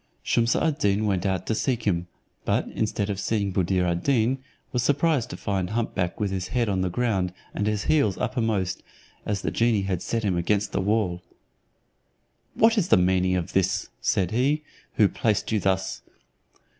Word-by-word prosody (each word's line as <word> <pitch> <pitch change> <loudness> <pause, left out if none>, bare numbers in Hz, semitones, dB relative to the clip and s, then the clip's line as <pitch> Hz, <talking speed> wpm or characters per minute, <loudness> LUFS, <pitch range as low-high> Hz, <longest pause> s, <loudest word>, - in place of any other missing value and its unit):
Shumse 115 0 +2
ad 155 -3 0
Deen 100 +1 +2
went 100 -1 0
out 95 -1 -1
to - - 0
seek 120 +2 -1
him, 90 -4 0 0.4
but, - - 0
instead 105 -1 -1
of 100 - -4
seeing 100 -1 0
Buddir 95 0 +1
ad 85 0 0
Deen, 130 -1 +2 0.3
was 125 - 0
surprised 145 -1 +2
to 90 - -6
find 95 -2 -2
hump 115 +2 -2
back 90 -2 -2
with 105 -2 0
his 95 -1 -3
head 120 +2 0
on 95 -2 0
the 95 - 0
ground, 95 -3 0 0.2
and 105 - -1
his 105 -1 0
heels 140 -11 +2
uppermost, 115 -7 -1 0.5
as 100 -2 -1
the - - -1
genie 115 -4 +2
had 95 -2 -2
set 115 -1 -2
him 95 -4 +1
against 100 +4 0
the - - 0
wall. 95 -3 0 1.3
"What 225 0 +4
is 180 - 0
the 110 - +5
meaning 90 0 +2
of 90 -2 -3
this?" 95 0 +1
said 90 -3 +1
he; 140 +6 +1 0.3
"who 105 - +5
placed 105 +1 0
you 110 - +2
thus?" 95 -10 -1
100 Hz, 185 wpm, -25 LUFS, 95-115 Hz, 1.3 s, the